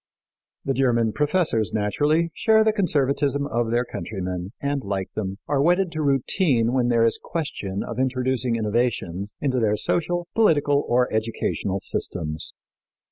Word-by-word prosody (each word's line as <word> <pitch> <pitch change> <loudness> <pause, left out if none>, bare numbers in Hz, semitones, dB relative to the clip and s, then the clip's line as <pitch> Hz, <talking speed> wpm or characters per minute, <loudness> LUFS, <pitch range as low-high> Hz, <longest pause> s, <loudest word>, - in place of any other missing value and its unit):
The 135 - +1
German 120 -4 +2
professors, 150 - +1
naturally, 150 +11 +1
share 220 +3 +4
the 220 0 +2
conservatism 145 - +1
of 120 -4 -1
their 120 +2 +1
countrymen, 90 -5 -5
and, 140 -1 -2
like 95 -1 -3
them, 95 -2 -4
are 140 -2 +1
wedded 175 +3 +2
to 155 -1 -3
routine 135 - +2
when 125 -2 +2
there 115 -1 +3
is 115 - +1
question 100 - -4
of 115 +1 -6
introducing 130 -1 0
innovations 105 -4 -1
into 130 -3 +1
their 105 -2 +2
social, 175 +7 -1
political 145 -9 +3
or 125 +1 +3
educational 110 -3 -1
systems. 80 -4 -3
125 Hz, 140 wpm, -24 LUFS, 110-145 Hz, -, share